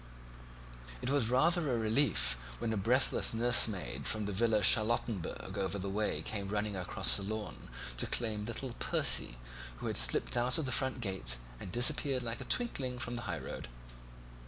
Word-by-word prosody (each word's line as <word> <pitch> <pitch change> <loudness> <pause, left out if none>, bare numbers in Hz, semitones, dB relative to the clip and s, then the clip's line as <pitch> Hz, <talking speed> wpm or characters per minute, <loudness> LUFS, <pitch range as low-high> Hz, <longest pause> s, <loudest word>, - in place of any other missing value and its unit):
It 130 - -1
was 140 -6 +2
rather 155 +4 +3
a 120 - +1
relief 115 - +2 0.2
when 110 - -2
a - - -1
breathless 115 +3 +1
nursemaid 100 - +3
from 105 - -1
the 105 - -3
Villa 110 +1 +2
Charlottenburg 110 -3 +1
over 95 +1 -1
the 100 0 -4
way 105 +2 -1
came 100 -3 -3
running 105 0 -2
across 90 -2 +1
the - - -4
lawn 105 +1 -6 0.3
to - - 0
claim 110 -3 0
little 120 +2 -4
Percy, - - +1 0.4
who - - -7
had - - 0
slipped - - +2
out 125 +1 +2
of 160 - -1
the 130 - -2
front 130 0 -1
gate 80 - -1 0.2
and 90 - -8
disappeared 130 +1 +3
like 115 -1 -4
a - - -5
twinkling 135 - -1
from 120 0 -5
the 120 - -4
high 85 - -2
road. - - -7
110 Hz, 175 wpm, -33 LUFS, 100-125 Hz, 0.4 s, rather